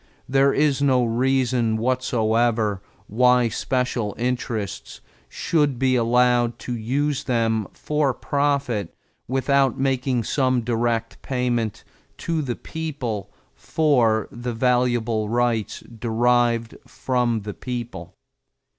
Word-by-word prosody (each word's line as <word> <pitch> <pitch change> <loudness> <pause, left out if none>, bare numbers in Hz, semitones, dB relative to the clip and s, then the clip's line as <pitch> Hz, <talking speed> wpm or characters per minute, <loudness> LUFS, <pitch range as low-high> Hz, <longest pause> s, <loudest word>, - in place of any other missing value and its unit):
There 135 +1 +3
is 145 -1 +1
no 130 -3 +3
reason 120 -1 +1
whatever 115 -3 +1 0.2
why 125 +2 +3
special 125 -4 -2
interests 120 -5 -3 0.3
should 145 -5 0
be 130 0 +2
allowed 120 0 +2
to 125 - -3
use 140 +5 -1
them 115 -5 0
for 150 -2 0
profit 140 - -1 0.3
without 135 0 +2
making 130 -2 0
some 130 +1 +1
direct 115 -1 -1
payment 120 -4 -2 0.3
to 165 -2 -2
the 125 -5 -3
people 125 - -5 0.2
for 120 -9 +1
the 120 0 -5
valuable 120 -3 +1
rights 120 -2 0 0.2
derived 120 0 +1
from 120 -3 -1
the 105 0 -6
people. 120 -9 -6
120 Hz, 100 wpm, -23 LUFS, 115-130 Hz, 0.3 s, There